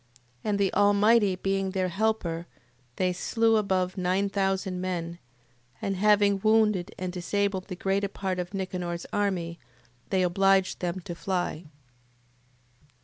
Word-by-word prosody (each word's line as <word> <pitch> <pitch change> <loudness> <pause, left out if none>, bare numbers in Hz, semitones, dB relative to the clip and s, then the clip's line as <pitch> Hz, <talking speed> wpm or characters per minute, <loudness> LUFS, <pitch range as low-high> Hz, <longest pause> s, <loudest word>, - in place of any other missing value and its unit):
And 210 -1 0
the 200 -2 +1
Almighty 205 0 +4
being 195 +1 -1
their 185 -1 -1
helper, 180 -4 -1 0.5
they 185 -1 +1
slew 225 +4 +2
above 190 -3 0
nine 185 +2 +1
thousand 190 -2 -1
men: 170 -2 -3 0.6
and 195 - -2
having 205 0 +4
wounded 215 -3 +3
and 180 -1 -4
disabled 190 +1 -1
the 185 - -5
greater 195 +2 0
part 190 -2 -3
of 175 0 -4
Nicanor's 180 -3 -4
army, 180 -5 -1 0.5
they 190 -1 +2
obliged 195 +1 +2
them 180 +1 -3
to 175 - -6
fly. 175 0 -3
190 Hz, 130 wpm, -27 LUFS, 180-200 Hz, 0.6 s, Almighty